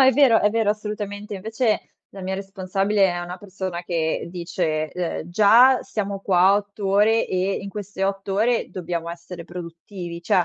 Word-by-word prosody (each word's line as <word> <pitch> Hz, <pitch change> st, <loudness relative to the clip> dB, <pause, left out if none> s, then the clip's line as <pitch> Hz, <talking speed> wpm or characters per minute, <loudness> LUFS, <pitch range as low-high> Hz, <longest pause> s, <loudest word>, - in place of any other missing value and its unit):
è 265 Hz, 0 st, +7 dB
vero, 260 Hz, -6 st, +5 dB
è 210 Hz, -, +3 dB
vero, 220 Hz, -1 st, +2 dB
assolutamente. 210 Hz, -1 st, -4 dB
Invece 220 Hz, +3 st, -1 dB, 0.2 s
la 195 Hz, -, -9 dB
mia 190 Hz, +1 st, -2 dB
responsabile 195 Hz, +1 st, 0 dB
è 175 Hz, 0 st, -3 dB
una 175 Hz, +1 st, -6 dB
persona 185 Hz, -2 st, -5 dB
che 165 Hz, -2 st, -1 dB
dice, 170 Hz, -3 st, -2 dB
ehm: 175 Hz, -2 st, -4 dB
"Già 230 Hz, +7 st, +6 dB
siamo 200 Hz, -5 st, -3 dB
qua 190 Hz, 0 st, +4 dB
8 205 Hz, 0 st, -3 dB
ore 210 Hz, +3 st, +4 dB
e 185 Hz, +1 st, 0 dB
in 200 Hz, -, -6 dB
queste 200 Hz, -1 st, -4 dB
8 195 Hz, 0 st, -2 dB
ore 230 Hz, +3 st, +1 dB
dobbiamo 170 Hz, -2 st, -4 dB
essere 170 Hz, 0 st, -9 dB
produttivi. 170 Hz, 0 st, -8 dB
Cioè: 175 Hz, +1 st, +3 dB
195 Hz, 165 wpm, -23 LUFS, 175-210 Hz, 0.2 s, è